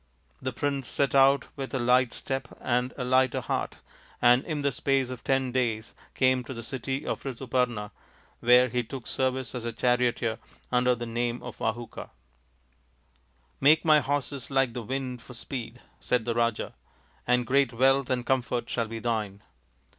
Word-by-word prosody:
The 130 - -2
prince 140 0 -2
set 140 -2 0
out 135 0 +5
with 135 -1 -5
a - - 0
light 125 0 +3
step 135 0 -4
and 125 +1 0
a 130 - -2
lighter 130 0 +3
heart, - - -3 0.4
and 125 +2 +5
in 150 -3 -3
the 140 - +2
space 135 0 0
of 125 -3 -8
ten 135 -1 +1
days 115 -3 -1 0.2
came 130 -1 +3
to 130 - -7
the 115 - -6
city 130 +3 -4
of - - -3
Rituparna, 125 -4 -1 0.5
where 125 +1 +6
he 125 0 0
took 120 +1 -8
service 130 0 -1
as 125 -3 -4
a 115 - -2
charioteer 120 -1 +1 0.3
under 125 0 +3
the 120 0 -5
name 120 +1 -2
of - - -8
Vahuka. 115 +1 -4 0.8
" 60 -1 -39
Make 155 +4 +5
my 155 -1 +7
horses 140 -2 -2
like 135 -3 +2
the 120 - -4
wind 125 +1 -4
for 125 - -12
speed," 120 -1 -6 0.2
said 125 -3 0
the 120 - 0
Raja, 115 -1 0 0.3
" 65 - -34
and 125 0 +3
great 135 +1 +3
wealth 135 +2 +3
and 125 -2 -1
comfort 125 -2 0
shall 115 -2 0
be 115 +1 -6
thine." 105 -3 -2
125 Hz, 175 wpm, -27 LUFS, 115-135 Hz, 0.8 s, my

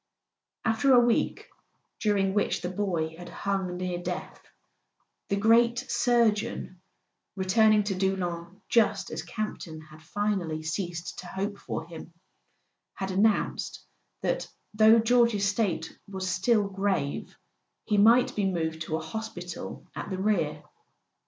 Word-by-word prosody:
After 225 +4 +3
a - - +8
week 240 -1 +1 0.5
during 200 -3 +1
which 205 -2 0
the 180 - -2
boy 175 -5 -1
had 175 - -9
hung 190 -3 -2
near 180 -1 -2
death, 180 0 -5 0.9
the 200 - +2
great 230 +3 +4
surgeon—returning 215 -3 +1
to 200 -1 -1
Doullens 185 -1 -2
just 210 -4 +2
as - - -3
Campton 175 -2 -5
had 155 0 -14
finally 180 -4 -2
ceased 170 +1 -4
to 180 - -8
hope 200 +3 -4
for 160 - -5
him—had 170 +3 -11
announced 205 +3 +1 0.4
that, - - 0 0.3
though 220 +1 +7
George's 230 -3 +3
state 200 -6 -1
was 190 -1 -4
still 200 +3 +2
grave, 195 -7 -2 0.5
he 210 -2 +2
might 235 +4 +5
be 195 -2 +1
moved 160 -2 -2
to 160 0 -2
a - - -3
hospital 185 -6 -6
at - - -5
the 190 - -3
rear. 170 -7 0
195 Hz, 125 wpm, -28 LUFS, 175-215 Hz, 0.9 s, a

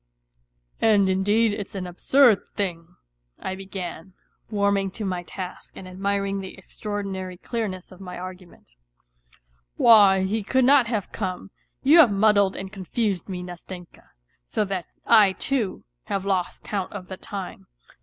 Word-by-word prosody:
" - - -52 0.3
And 205 -4 +4
indeed 205 +4 +2
it's 205 -1 -6
an 190 -2 -3
absurd 220 +6 +3
thing," 175 -3 -4 0.4
I 190 - -4
began, 190 -2 -7 0.4
warming 200 -2 +1
to 215 - -3
my 180 -2 -2
task 180 +1 -8
and 185 - -9
admiring 195 +1 -1
the 190 -1 -8
extraordinary 195 -3 -5
clearness 195 -3 -4
of 185 +1 -14
my 180 -1 -7
argument, 185 - -10 0.6
" - - -35
why, 200 -4 +7
he 210 +4 -1
could 260 +5 +2
not 270 -2 +6
have 215 -5 -2
come; 190 -1 -4 0.3
you 300 +5 +7
have 270 -10 +8
muddled 200 -1 +3
and 190 +1 -7
confused 195 -1 -2
me, 180 -1 -4
Nastenka, 180 0 -10 0.3
so 135 - -1
that 190 -3 -4 0.2
I 210 -4 +6
too, 235 -3 -2 0.2
have 195 -1 -2
lost 190 -3 -1
count 195 -3 -3
of 190 -3 -7
the 190 - -7
time. 185 - -7
195 Hz, 150 wpm, -24 LUFS, 185-210 Hz, 0.6 s, have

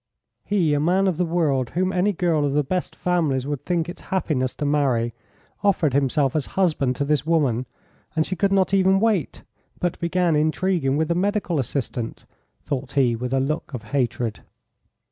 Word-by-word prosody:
"He, 180 -7 +1
a 145 - +2
man 185 +6 +2
of 180 -4 0
the 180 - +1
world, 150 -7 +1
whom 185 +1 +1
any 185 +3 +2
girl 170 -5 +1
of 140 -1 0
the 150 +1 +2
best 180 +6 -3
families 155 -8 0
would 145 -2 -4
think 170 -2 0
it 175 - -7
happiness 140 -9 -1
to 150 - -3
marry, 130 -6 +1 0.5
offered 170 -8 +2
himself 140 0 +1
as 155 - 0
a - - -17
husband 155 -9 +2
to 140 - -1
this 150 -1 +1
woman, 140 -7 +1 0.5
and 160 -1 +2
she 185 - -3
could 195 +3 +1
not 195 0 +2
even 190 0 +4
wait, 210 -7 0 0.4
but 175 -1 -1
began 170 -1 +1
intriguing 155 -2 +1
with 160 0 +1
the - - +3
medical 185 -2 0
assistant," 125 -2 -3 0.4
thought 135 -2 -4
he, 130 -4 +3
with 125 +2 -4
a 135 - +2
look 150 +1 -2
of 115 - -6
hatred. 120 -4 -1
155 Hz, 185 wpm, -23 LUFS, 135-180 Hz, 0.5 s, even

